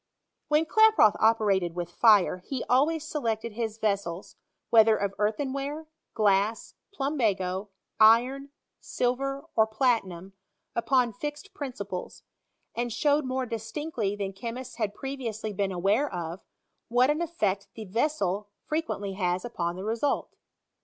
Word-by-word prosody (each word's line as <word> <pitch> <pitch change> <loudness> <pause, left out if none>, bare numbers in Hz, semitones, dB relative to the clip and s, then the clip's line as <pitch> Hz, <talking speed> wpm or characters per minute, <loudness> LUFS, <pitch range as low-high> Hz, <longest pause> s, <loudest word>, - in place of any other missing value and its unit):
When 300 +2 +3
Klaproth 435 - +5
operated 200 -6 +2
with 175 -1 -4
fire, 205 -1 +5
he 250 +7 -5
always 300 +5 +2
se 300 - -3
lected 225 -2 -2
his 220 -1 -3
vessels, 200 -5 -2 0.4
whether 220 -1 +6
of 200 -1 -2
earthenware, 275 +8 -2 0.3
glass, 205 +1 +1 0.2
plumbago, 210 - -1 0.3
iron, 245 +6 +5 0.3
silver, 275 +3 -2
or 220 0 +4
platinum, 215 -6 0 0.4
upon 245 0 +2
fixed 295 - -6
principles; 200 -10 -6 0.5
and 240 0 -2
showed 290 +4 +2
more 260 0 -1
distinctly 225 -1 -3
than 195 -1 -4
che 230 +5 -5
mists 255 +2 -8
had 210 -3 -2
previously 230 -6 -4
been 195 0 -1
aware 200 +10 +1
of, 170 +1 -5 0.5
what 250 +4 +4
an 305 +3 -1
effect 210 - -1
the 220 - -7
vessel 205 -3 -1 0.2
frequently 300 -11 -2
has 180 +1 -1
upon 170 -7 -3
the 185 - -6
result. 230 +6 -1
225 Hz, 130 wpm, -27 LUFS, 200-275 Hz, 0.5 s, whether